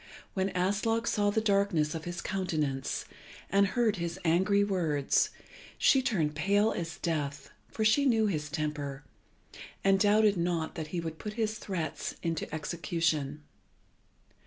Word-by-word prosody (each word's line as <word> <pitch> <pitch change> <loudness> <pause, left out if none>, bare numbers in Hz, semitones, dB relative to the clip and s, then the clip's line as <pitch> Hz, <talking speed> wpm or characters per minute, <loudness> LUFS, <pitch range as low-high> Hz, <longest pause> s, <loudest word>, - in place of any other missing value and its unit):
When 190 0 0
Aslog 210 +5 +1
saw 205 -3 +2
the 220 +2 +1
darkness 200 -8 +2
of 160 0 -5
his 175 0 -4
countenance, 155 -9 -2 0.5
and 200 0 +4
heard 220 +1 +1
his 170 0 -3
angry 190 +5 +3
words, 165 -8 +1 0.5
she 265 - +5
turned 175 - 0
pale 200 +7 +2
as 165 -1 -4
death, 145 -4 -3 0.2
for 220 - -2
she 275 +6 +4
knew 225 -3 +3
his 155 -7 -1
temper, 150 -3 -3 0.8
and 195 0 +4
doubted 210 0 +4
not 170 -2 -1
that 160 -2 -5
he 170 +3 -3
would 160 -1 -5
put 210 - -5
his 220 -1 -1
threats 170 -6 -4
into 165 -2 -2
execution. 155 -2 -1
175 Hz, 140 wpm, -30 LUFS, 155-205 Hz, 0.8 s, she